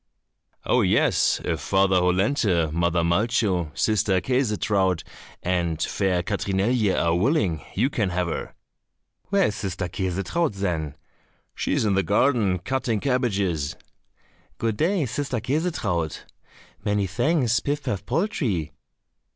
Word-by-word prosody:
"Oh, - - +3
yes, - - +3
if 80 -3 -1
Father 95 +4 +2
Hollenthe, 90 - +2
Mother 85 0 +1
Malcho, 95 -1 +1
Sister 105 -3 +2
Käsetraut, 105 -5 +1 0.4
and 85 -3 0
fair 90 0 0
Katrinelje 100 +2 +1
are 85 0 +2
willing, 95 - +1
you 115 +7 +2
can 105 -8 0
have 90 0 -1
her." 85 - -5 0.7
"Where 195 0 +2
is 105 - -1
Sister 95 -3 -3
Käsetraut, 100 - -1
then?" 80 -7 -2 0.6
"She - - -2
is - - +1
in 105 - +2
the 95 - +3
garden 105 -2 +2
cutting 115 +3 -1
cabbages." 100 - 0 0.8
"Good 115 -2 -1
day, 170 -1 +1
sister 130 0 -2
Käsetraut." 115 - -1 0.6
"Many 105 -1 +1
thanks, 120 - +1
Pif 145 0 -2
paf 105 -8 -3
poltrie." 120 - -1
100 Hz, 120 wpm, -24 LUFS, 90-125 Hz, 0.8 s, Oh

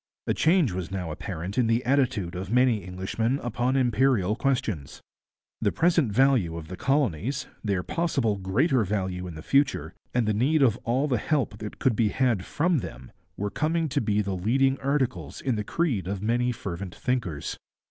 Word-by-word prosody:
A - - +1
change 160 - +3
was 90 -1 -4
now 90 -4 -4
apparent 90 +7 -4
in 120 - +3
the 115 +2 +1
attitude 125 -9 +1
of 95 +1 -5
many 125 -3 +3
Englishmen 95 +8 -1
upon 120 +2 0
imperial 120 -5 +2
questions. 115 - -1 0.6
The - - +2
present 165 -8 +2
value 115 -8 +3
of 80 -1 -8
the 95 - -5
colonies, 135 - 0 0.2
their 100 -4 0
possible 135 -11 0
greater 115 - +2
value 95 -2 -2
in 85 - -7
the 80 - -8
future, 135 - +1 0.2
and 120 -3 +1
the 110 - +2
need 140 +8 +3
of 115 -5 +4
all 130 +5 +1
the 125 -6 +1
help 125 -6 -1
that 105 -1 -7
could 130 -5 +2
be 110 -2 +2
had 120 -5 +1
from 165 +1 +1
them, 65 - -8 0.3
were 100 0 -2
coming 160 +1 0
to - - 0
be 105 -1 +1
the 100 -1 -2
leading 135 +8 +2
articles 140 -2 -1
in 130 - -1
the 105 - -2
creed 120 - -1
of 100 0 -2
many 120 +4 +1
fervent 95 -5 -6
thinkers. 115 - -2
115 Hz, 180 wpm, -26 LUFS, 95-135 Hz, 0.6 s, of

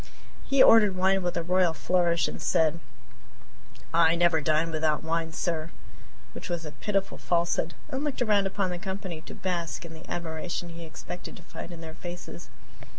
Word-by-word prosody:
He 275 -1 +5
ordered 210 -4 +7
wine 190 +1 +3
with 175 0 -1
a 170 - 0
royal 180 -1 +3
flourish 170 +1 +2
and - - -6
said: 160 0 +2 1.1
"I 165 0 +5
never 170 -2 +3
dine 155 +2 +2
without 155 -1 +1
wine, 165 0 -1
sir" 160 -1 -2 0.6
(which - - -7
was 170 -2 -2
a 150 - -6
pitiful 195 +4 -2
falsehood), 170 -1 0
and 275 -1 -3
looked 290 -4 0
around 205 -4 +3
upon 195 -1 -1
the 175 - -4
company 190 -4 -5
to - - -10
bask 175 -2 -3
in 165 - -9
the 160 +1 -12
admiration 170 +1 -3
he 170 0 -8
expected 165 +2 -8
to - - -13
find 175 - -8
in 170 -1 -9
their 160 -1 -7
faces. 175 - -8
170 Hz, 175 wpm, -28 LUFS, 165-185 Hz, 1.1 s, ordered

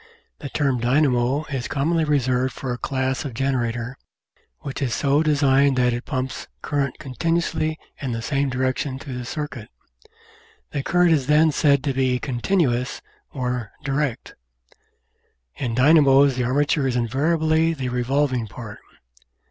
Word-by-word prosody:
The 140 - -6
term 135 -3 0
dynamo 130 +2 +2
is 125 -4 -2
commonly 160 +5 0
reserved 130 -3 +1
for 130 -2 -4
a - - -5
class 130 +2 -1
of 135 -6 -6
generator 125 -1 -2 0.6
which 140 0 -6
is 125 -4 0
so 140 +1 +2
designed 140 -3 +3
that 125 -1 +3
it 120 +2 -4
pumps 130 -2 -4 0.2
current 140 -3 -1
con 135 -4 -9
tinuously 160 0 0 0.3
in 135 -3 -3
the 115 -1 -3
same 140 +1 0
direction 130 +1 -1
through 130 -2 -7
the 125 - -6
circuit. 125 -6 -5 1.0
The 140 - -2
current 175 +4 +3
is 140 -5 +2
then 155 +1 +5
said 140 -2 +3
to 140 -3 0
be 130 -1 +1
"continuous," 125 -1 -1 0.3
or 125 -4 -3
"direct." 140 -3 -2 1.2
In 120 -4 -2
dynamos 140 0 +5
the 125 -1 -1
armature 145 +2 +1
is 125 - -1
invariably 160 +6 +1
the 130 -3 -3
revolving 125 0 0
part. 105 0 -9
135 Hz, 145 wpm, -23 LUFS, 125-145 Hz, 1.2 s, then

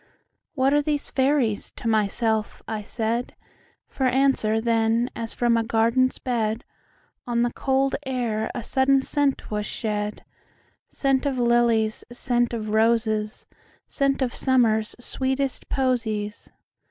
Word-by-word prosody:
"What 270 0 +2
are 295 - +4
these 290 -1 -2
fairies?" 260 -6 +1
to - - -6
myself 220 0 0
I 220 -1 -3
said; 230 +3 -2 0.5
For 265 - -1
answer, 255 -4 +2
then, 230 +1 +1
as 230 -1 -5
from 240 -1 +2
a 230 - +1
garden's 230 +3 +2
bed, 225 -3 -1 0.6
On 235 -1 +1
the 240 - -1
cold 270 0 +1
air 240 -5 -2
a 245 - -4
sudden 265 +2 +3
scent 285 -5 -1
was 210 0 -2
shed,—Scent 220 +5 -4
of 270 -2 -1
lilies, 235 -2 +2
scent 240 -1 0
of 215 -3 -4
roses, 220 -1 +1 0.4
Scent 275 -1 0
of 245 - -2
Summer's 225 -5 +2
sweetest 265 +2 -2
posies. 225 -6 -1
235 Hz, 125 wpm, -24 LUFS, 220-265 Hz, 0.6 s, are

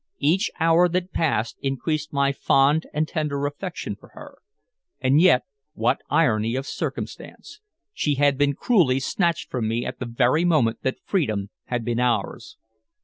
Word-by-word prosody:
Each 170 +9 +2
hour 165 +2 +4
that 180 +1 -2
passed 120 -8 0
increased 150 +3 -2
my 140 -1 +2
fond 140 +3 +2
and 155 +1 -1
tender 145 -3 -2
affection 165 +5 -5
for - - -19
her. - - -12 0.6
And 135 +4 +3
yet 170 -9 +5 0.3
what - - +1
irony 110 +2 +2
of 135 +1 -3
circumstance! 425 - -6 0.3
She 150 - 0
had 140 0 +3
been 140 +1 +1
cruelly 165 - +2
snatched 170 +5 -1
from 120 -4 -1
me 115 +2 -1
at 125 - -6
the 125 - -4
very 125 +7 +2
moment 150 -10 +2
that 130 - -2
freedom 110 - -1
had 120 -2 -3
been 120 0 -1
ours. 120 -5 -1
140 Hz, 155 wpm, -23 LUFS, 125-160 Hz, 0.6 s, yet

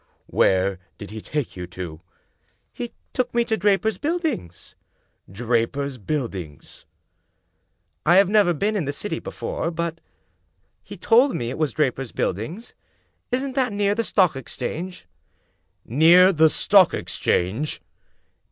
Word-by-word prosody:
"Where 95 0 +2 0.2
did 105 - -9
he 110 0 -7
take 150 +1 -4
you 90 -1 -6
to?" 85 -3 -8 0.4
" - - -48 0.3
He 240 -1 -6 0.2
took 250 -2 -1
me 235 0 +3
to 220 - 0
Draper's 205 +2 +1
Buildings." 310 - -3 0.6
"Draper's 120 +5 -1
Buildings?" 100 - -5 0.6
" - - -49
I 175 - +6
have 195 0 +6
never 205 -3 +4
been 210 +8 0
in 185 -7 -1
the 145 - -2
City 165 +2 -4
before, 165 - -4
but 170 0 -4 0.8
he - - -10
told 250 +4 +4
me 120 0 -3
it - - -6
was 155 -3 0
Draper's 135 -4 -1
Buildings. 160 - -3 0.6
Isn't 260 +2 -1
that 255 -3 +1
near 200 0 +1
the 230 +2 -1
Stock 185 -9 +2
Ex 135 - -7
change? 170 - -5 0.3
" - - -43
" - - -47
Near 170 - +6
the 160 -1 +5
Stock 195 +2 +4
Exchange? 105 +9 -1
160 Hz, 145 wpm, -23 LUFS, -, 0.8 s, I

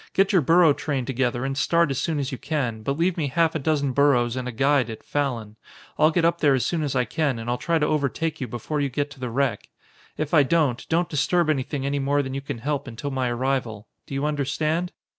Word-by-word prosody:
Get 195 +1 +2
your 185 - +5
burro 165 +2 +5
train 140 -3 -3
together 125 -1 -1
and 135 0 -2
start 170 +2 +2
as 135 - -1
soon 160 -3 -1
as 140 -2 -2
you 130 - -5
can, 135 -7 -2
but 140 +6 -2
leave 175 +2 +1
me 155 -4 0
half 165 +4 +2
a 160 - -1
dozen 145 -1 0
burros 125 -3 +3
and 130 -1 -3
a - - -3
guide 135 0 +2
at 110 - -8
Fallon. 120 -7 -3 0.4
I'll 155 - +6
get 165 +1 +1
up 170 0 +1
there 145 -3 +4
as 125 -3 0
soon 170 +1 -1
as 145 -3 -2
I 125 -1 +2
can 135 +2 -1
and 115 +1 -7
I'll 120 0 -1
try 170 -1 +1
to 150 - +1
overtake 155 +2 -1
you 130 - -2
before 145 +6 -3
you 140 - 0
get 145 +3 -2
to 145 - -13
the 125 -1 -3
wreck. 125 -3 -1 0.5
If 155 +1 -3
I 155 - +7
don't, 140 -3 +1
don't 170 +1 +2
disturb 155 +2 +1
anything 135 -1 -2
any 140 +1 0
more 140 +1 +1
than 130 -1 -5
you 135 - -3
can 140 -2 -5
help 140 +3 -3
until 125 +4 -5
my 130 -2 -1
arrival. 120 -3 -2 0.2
Do 135 - -6
you 135 +2 -1
understand?" 150 +4 -1
140 Hz, 250 wpm, -24 LUFS, 130-155 Hz, 0.5 s, I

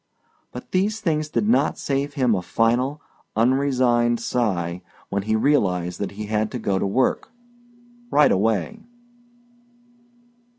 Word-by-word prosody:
But 125 - -10
these 205 +4 0
things 155 -6 -1
did 210 - -1
not 235 - +2
save 140 +1 -2
him 125 -5 +2
a 95 - 0
final, 120 +9 0 0.4
unresigned 120 -1 +2
sigh 90 -8 -1 0.3
when 100 - -1
he 110 +2 0
realized 90 -9 +1
that 100 - -4
he 105 +1 -6
had 110 0 -1
to - - -2
go 100 -4 -1
to - - 0
work 125 +7 0 0.8
right 150 -7 +4
away. 110 - 0
120 Hz, 130 wpm, -23 LUFS, 105-140 Hz, 0.8 s, right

